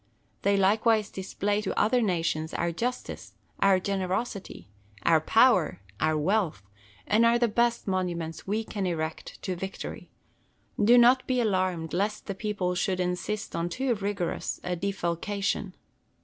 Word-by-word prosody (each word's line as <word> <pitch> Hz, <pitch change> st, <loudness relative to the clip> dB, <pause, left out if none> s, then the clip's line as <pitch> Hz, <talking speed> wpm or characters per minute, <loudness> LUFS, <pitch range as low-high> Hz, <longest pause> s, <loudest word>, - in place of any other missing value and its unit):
They 200 Hz, 0 st, +2 dB
likewise 215 Hz, +2 st, +3 dB
display 205 Hz, +2 st, -2 dB
to -, -, -2 dB
other 245 Hz, +3 st, +3 dB
nations 165 Hz, -5 st, -1 dB
our 170 Hz, 0 st, 0 dB
justice, 245 Hz, +9 st, -4 dB, 0.3 s
our 195 Hz, -1 st, +4 dB
generosity, 195 Hz, -, -3 dB, 0.4 s
our 160 Hz, -2 st, +4 dB
power, 220 Hz, -, +4 dB, 0.2 s
our 155 Hz, 0 st, +2 dB
wealth, 165 Hz, -, 0 dB, 0.4 s
and 220 Hz, +2 st, +3 dB
are 235 Hz, +1 st, +5 dB
the 240 Hz, 0 st, +3 dB
best 235 Hz, +1 st, +1 dB
monuments 175 Hz, -4 st, -2 dB
we 215 Hz, +3 st, 0 dB
can 200 Hz, -3 st, -3 dB
erect 160 Hz, -2 st, -4 dB
to 185 Hz, -, -2 dB
Victory. 190 Hz, +2 st, -6 dB, 0.7 s
Do 235 Hz, +4 st, +7 dB
not 245 Hz, +2 st, +5 dB
be 255 Hz, -1 st, +1 dB
alarmed 185 Hz, -7 st, 0 dB
lest 205 Hz, +4 st, -1 dB
the 200 Hz, -, -3 dB
people 195 Hz, -3 st, -2 dB
should 185 Hz, +1 st, -1 dB
insist 180 Hz, +4 st, -2 dB
on 170 Hz, +1 st, -1 dB
too 260 Hz, +7 st, 0 dB
rigorous 200 Hz, -4 st, -3 dB
a 180 Hz, 0 st, -2 dB
defalcation. 195 Hz, +1 st, -2 dB
195 Hz, 140 wpm, -27 LUFS, 175-215 Hz, 0.7 s, Do